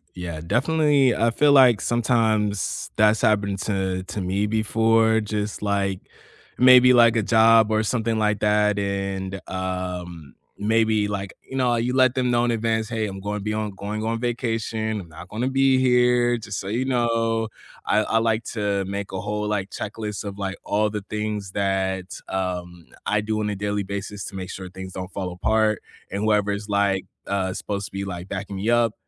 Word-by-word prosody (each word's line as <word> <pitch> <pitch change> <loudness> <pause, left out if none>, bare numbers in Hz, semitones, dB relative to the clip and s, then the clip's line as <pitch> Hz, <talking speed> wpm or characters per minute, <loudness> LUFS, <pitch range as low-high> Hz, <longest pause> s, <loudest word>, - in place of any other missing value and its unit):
yeah, 85 -3 -5
definitely, 140 - +2
I 115 - +2
feel 145 +5 +3
like 130 -6 +6
sometimes 110 -4 0
that's 105 +1 +4
happened 100 -4 +1
to 95 -3 -1
to 100 +2 -5
me 95 +3 0
before, 110 +1 +2
just, 105 0 -3
like 100 -2 0 0.6
maybe, 125 0 +8
like, 120 -2 +6
a 115 - +3
job, 110 +1 +5
or 110 0 +2
something, 115 0 0
like, 105 -1 +1
that, 105 0 +2
and, 100 -1 -3
um, 90 -4 -5 0.2
maybe, 110 0 +2
like, 100 -1 -4 0.2
you 130 - -8
know, 125 -2 +2
you 120 +2 -1
let 130 -1 +4
them 125 -1 +1
know 120 0 +2
in - - 0
advance, 110 -1 -1
"Hey, 110 -2 -1
I'm 95 -1 -7
gonna 105 +2 -3
be 105 +2 -2
on 110 -1 -2
going 105 +3 -4
on 115 +1 -1
vacation, 115 -2 -2
I'm 90 - -12
not 90 +3 -11
gonna 120 +5 -2
be 135 0 +3
here, 125 -1 +3
just 105 -3 -5
so 95 - -6
you 120 +6 -1
know" 115 -3 +1 0.4
I 105 - +3
I 115 - 0
like 115 0 +1
to 100 -2 0
make 100 +1 -5
a 95 -1 -4
whole, 105 +1 -3
like, 105 -2 -2
checklist 105 +1 -5
of, 100 -1 -7
like, 95 -1 -3
all 105 +1 +1
the 105 -1 -5
things 105 -2 -3
that, 95 -1 -1 0.2
um, 90 -2 -4 0.2
I 105 0 +1
do 110 +1 -2
on 105 -1 -1
a - - -3
daily 105 +1 -2
basis 100 0 -5
to 95 - -8
make 95 -1 -5
sure 95 -1 -7
things 95 0 -9
don't 95 +1 -6
fall 95 -2 -4
apart, 110 +3 +1 0.3
and 100 +2 -2
whoever's 105 -1 +1
like 100 -2 +1 0.2
uh, 95 -1 -1
supposed 100 0 -4
to - - -17
be, 100 0 -4
like, 90 -1 -6
backing 100 +1 -5
me 100 +4 -2
up, 120 -2 +3
105 Hz, 190 wpm, -23 LUFS, 100-115 Hz, 0.6 s, maybe